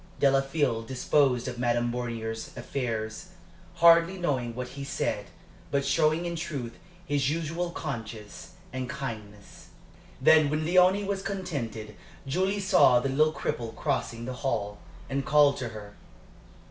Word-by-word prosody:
Delafield 135 -4 +2
disposed 130 0 +2
of 125 -1 -5
Madame 120 -1 +1
Bornier's 115 -2 -4
affairs, 110 -5 -4 0.5
hardly 170 +2 +6
knowing 130 -9 -1
what 125 0 -5
he 140 0 -7
said, 140 - -2 0.4
but 140 -1 0
showing 155 +4 +2
in 170 0 -3
truth 140 -8 -5 0.3
his 145 -4 +1
usual 165 +2 -2
conscience 110 -9 -7 0.2
and 130 -1 -4
kindness. 110 -7 -7 0.5
Then 155 -2 +6
when 155 +1 -1
Léonie 185 +4 +4
was 195 -1 -2
contented, 135 - -4 0.3
Julie 190 +8 0
saw 190 -10 +5
the 135 - -1
little 155 +4 +3
cripple 115 -6 -4
crossing 115 0 -2
the 130 - -4
hall, 105 -6 -2 0.3
and 135 0 -2
called 145 0 +4
to 125 -3 -4
her. 105 -2 -10
135 Hz, 135 wpm, -28 LUFS, 115-160 Hz, 0.5 s, hardly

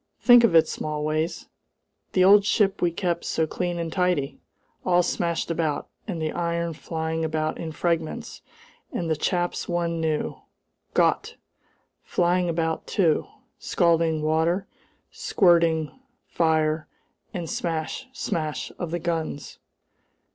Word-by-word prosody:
"Think 245 -1 +7
of 225 -8 +4
it, 165 - +6
Smallways! 155 +2 -2 0.7
The 185 - +4
old 200 +2 +7
ship 200 -1 +2
we 175 - +3
kept 170 0 -2
so 160 - 0
clean 175 +2 -3
and 165 -1 -3
tidy! 180 -7 0 0.4
All 180 -1 +3
smashed 170 -1 -1
about, 160 -3 -1 0.2
and 180 -6 -3
the 155 -1 -1
iron 170 -1 -1
flying 160 +1 -3
about 155 0 -1
in 160 - -4
fragments, 165 0 -2 0.5
and 165 -2 -2
the - - +3
chaps 175 +4 -1
one 170 -1 -1
knew 155 -1 -1 0.6
Gott! - - +2 0.7
flying 175 0 +1
about 160 -1 -1
too! 165 -6 +2 0.3
Scalding 165 -2 +2
water 160 +5 +1 0.5
squirting, 165 -4 +3 0.3
fire, 155 -1 +1 0.4
and 180 -5 -4
the - - -6
smash, 165 - -3
smash 155 - -3
of 175 - -3
the 170 - -1
guns! 160 -4 -4
165 Hz, 125 wpm, -25 LUFS, 160-175 Hz, 0.7 s, Think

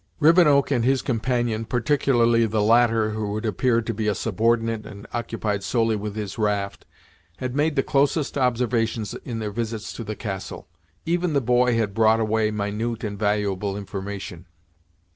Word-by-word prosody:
Rivenoak 150 -4 +5
and 120 -4 +2
his 130 +1 +2
companion, 120 -2 -1
particularly 120 -2 +2
the 105 -1 0
latter 115 -1 +3
who 105 -1 -3
had 110 +2 -3
appeared 115 +2 +1
to 115 - -2
be 110 0 -2
a 105 - +1
subordinate 115 +1 0
and 100 -1 -10
occupied 110 -4 -2
solely 115 +1 +1
with 105 0 -5
his 105 0 -5
raft, 100 -2 -1 0.5
had 125 -1 -4
made 150 +1 +1
the 135 - +2
closest 145 +1 +1
observations 115 -5 0
in 120 -3 -5
their 105 -2 -3
visits 115 0 -4
to 115 - -6
the 110 0 -5
castle. 95 -8 -6 0.4
Even 170 0 0
the 140 - +3
boy 125 -1 +2
had 105 -3 0
brought 110 +1 +4
away 110 0 +1
minute 105 +2 -3
and 100 -2 -4
valuable 100 -1 0
information. 95 -3 -6
115 Hz, 160 wpm, -24 LUFS, 105-120 Hz, 0.5 s, Rivenoak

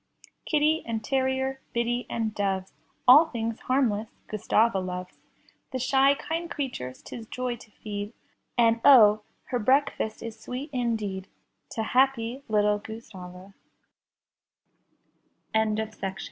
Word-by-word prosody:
Kitty 310 +1 +2
and 225 -2 -3
terrier, 265 +1 0
biddy 240 +1 -1
and 225 -2 -2
doves. 195 -2 -2 0.3
All 295 +6 +9
things 230 -5 -3
harmless 230 -5 0 0.2
Gustava 215 0 +2
loves. 180 0 -6 0.5
The 260 - -2
shy, 270 +2 +4
kind 330 +3 -4
creatures 245 - -5
'tis 225 -2 -8
joy 250 0 -3
to 225 - -16
feed, 205 0 -6 0.4
And 230 -1 +4
oh, 215 -6 +8 0.3
her 245 - 0
breakfast 255 -2 +1
is 225 -1 -7
sweet 260 +6 -6
indeed 215 -6 -2 0.5
To 225 - -2
happy 255 +1 +1
littl 210 -1 +2
235 Hz, 105 wpm, -27 LUFS, 215-265 Hz, 0.5 s, All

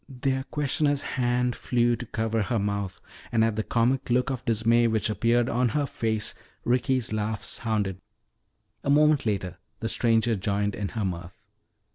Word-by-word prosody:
Their 130 0 -1
questioner's 145 0 0
hand 125 -1 0
flew 120 -1 +1
to 120 +1 -7
cover 110 0 -1
her 115 +4 0
mouth, 100 -2 -2 0.3
and 115 -1 +3
at 115 -2 0
the 110 - 0
comic 125 +4 +1
look 125 +2 +2
of 130 -2 -4
dismay 115 +1 +3
which 110 -1 +1
appeared 120 +2 +2
on 125 +1 +1
her 145 - +1
face, 110 -5 -1 0.3
Ricky's 125 -1 +1
laugh 110 0 -2
sounded. 105 -5 -1 0.8
A - - -2
moment 150 -2 +4
later 95 -3 -2 0.2
the 115 - -2
stranger 115 0 +2
joined 100 +1 -1
in 100 0 -3
her 110 -3 -2
mirth. 85 -1 -6
115 Hz, 160 wpm, -26 LUFS, 105-125 Hz, 0.8 s, moment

